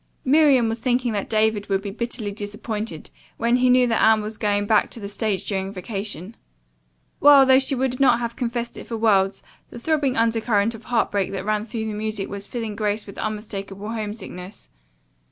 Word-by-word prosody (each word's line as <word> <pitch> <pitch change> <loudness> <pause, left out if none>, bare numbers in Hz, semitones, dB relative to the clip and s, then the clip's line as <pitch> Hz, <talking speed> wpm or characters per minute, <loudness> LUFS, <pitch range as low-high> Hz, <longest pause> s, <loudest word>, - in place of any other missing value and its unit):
Miriam 275 -4 +5
was 225 +1 -2
thinking 245 -1 0
that 200 -2 -3
David 215 -1 +1
would 195 0 0
be 200 - -4
bitterly 235 -1 -3
disappointed 210 -3 -5 0.3
when 235 +1 +2
he 250 0 +3
knew 250 0 +5
that 230 -2 +1
Anne 220 -1 +5
was 215 +1 -6
going 205 -1 +1
back 215 0 +3
to - - -6
the 200 - -6
stage 200 -2 -2
during 195 -1 -2
vacation. 200 0 -5 0.8
While, 285 -2 +8
though 260 0 +6
she 275 +1 +1
would 255 0 -1
not 250 -4 +5
have 235 -1 -4
confessed 235 -1 -3
it - - -8
for 230 - -4
worlds, 200 -3 +2 0.3
the - - -10
throbbing 280 0 0
undercurrent 225 -1 +1
of 225 0 -12
heart 245 -2 +1
break 200 -2 0
that 195 0 -4
ran 215 0 0
through 225 -1 -4
the 215 - -3
music 210 -1 -3
was 200 0 -5
filling 225 -4 -4
Grace 210 0 -1
with 200 - -10
unmistakable 210 -1 -5
homesickness. 210 -4 -7
220 Hz, 190 wpm, -23 LUFS, 205-235 Hz, 0.8 s, While